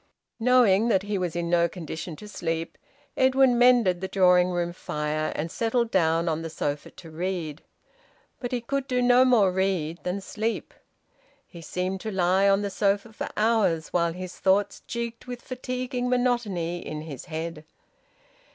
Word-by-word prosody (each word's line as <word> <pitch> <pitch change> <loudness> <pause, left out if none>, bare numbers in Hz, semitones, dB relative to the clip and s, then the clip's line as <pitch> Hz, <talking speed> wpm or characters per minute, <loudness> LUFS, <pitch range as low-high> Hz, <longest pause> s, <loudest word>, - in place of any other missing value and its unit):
Knowing 230 -3 +4
that 195 -5 +2
he 205 0 -3
was 175 -3 -2
in 170 0 -1
no 170 0 +3
condition 165 -1 -6
to 210 - -11
sleep, 165 -4 -3 0.4
Edwin 260 -1 +4
mended 240 -8 +4
the 190 - -2
drawing 180 -2 +4
room 175 -1 -2
fire, 150 -2 -2
and 160 +2 -3
settled 230 0 0
down 165 -2 +2
on 160 -1 0
the 165 - -5
sofa 145 -2 -3
to 165 -2 -13
read. 165 -2 -4 0.8
But 245 - -4
he 250 -1 -1
could 275 +3 -3
no 250 0 +4
more 230 -7 +4
read 180 -4 -1
than 180 +2 -2
sleep. 215 +3 -3 0.7
He 170 - -12
seemed 185 +4 -3
to 220 - -4
lie 190 +1 +3
on 195 +1 +3
the 200 - -2
sofa 200 +3 0
for - - -5
hours 210 -8 +2
while 170 -1 +1
his 185 +1 -8
thoughts 195 +1 +2
jigged 235 0 -5
with 245 -1 -7
fatiguing 250 0 -3
monotony 230 -9 0
in 155 -2 -6
his 150 -5 -8
head. 160 -1 -5
190 Hz, 160 wpm, -26 LUFS, 170-235 Hz, 0.8 s, Knowing